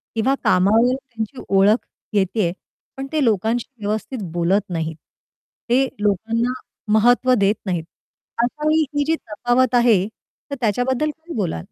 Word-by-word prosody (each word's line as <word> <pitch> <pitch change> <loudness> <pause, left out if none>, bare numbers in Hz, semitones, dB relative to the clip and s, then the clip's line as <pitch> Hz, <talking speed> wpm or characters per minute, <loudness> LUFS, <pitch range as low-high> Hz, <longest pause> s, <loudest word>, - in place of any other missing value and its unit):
किंवा 260 +5 +2
कामावर 220 +7 +4
त्यांची 250 -2 -7
ओळख 200 +4 +4 0.3
येतेय, 190 -2 +1 0.5
पण 270 0 -4
ते 305 -3 +1
लोकांशी 225 +1 +1 0.2
व्यवस्थित 220 +4 -3
बोलत 175 +4 +2
नाहीत. 160 -2 -3 0.7
ते 260 +3 +4
लोकांना 225 +4 0 0.4
महत्त्व 245 +3 +4
देत 200 +2 +3
नाहीत. 175 -4 -1 0.6
अशावेळी 305 +5 +1 0.2
ही 290 - +3
जी 320 +1 +2
तफावत 245 +1 0
आहे 225 -6 +4
तर 280 +5 -12
त्याच्याबद्दल 245 +7 +1
काय 330 +1 -10
बोलाल? 180 - -1
230 Hz, 130 wpm, -21 LUFS, 200-255 Hz, 0.7 s, कामावर